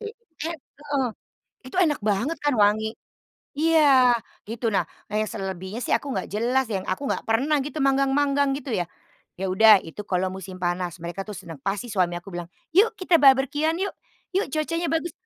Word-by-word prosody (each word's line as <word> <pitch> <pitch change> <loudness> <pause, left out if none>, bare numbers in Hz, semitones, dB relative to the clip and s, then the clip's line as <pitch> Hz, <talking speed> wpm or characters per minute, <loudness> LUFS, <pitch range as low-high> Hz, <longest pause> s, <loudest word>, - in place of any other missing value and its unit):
Te 435 - -5 0.4
et 335 - -4
heeh, 285 -3 -3 0.6
itu 260 - -8
enak 310 -8 +2
banget 225 +10 0
kan 290 - +3
wangi 215 +1 +3 0.7
iya, 285 -6 +5 0.3
gitu. 230 0 -1
Nah - - +2 0.3
yang 215 +1 0
selebihnya 190 +1 -5
sih - - 0
aku 285 - -3
nggak 190 - -2
jelas 245 +5 +1
yang 190 -2 -2
aku 190 +10 -2
nggak - - -1
pernah 270 +7 +2
gitu 295 +2 -6
manggang-manggang 275 +1 +2
gitu 265 -4 -5
ya. 175 - 0 0.6
Ya 195 - -1
udah, 215 +1 +7
itu 165 +5 -9
kalau 185 0 0
musim 190 -1 -8
panas 175 -1 -2
mereka 175 +3 -4
tuh - - -4
senang 165 -2 -9
pasti 205 +5 -2
suami 180 -3 +1
aku 195 - -14
bilang, 175 -1 -5 0.3
"Yuk 450 +3 +6
kita 360 -2 +4
barbeque-an 280 +4 +4
yuk, 400 - -2 0.4
yuk 390 - +2
cuacanya 330 +2 -1
bagus" 325 0 -1
245 Hz, 175 wpm, -24 LUFS, 195-290 Hz, 0.7 s, udah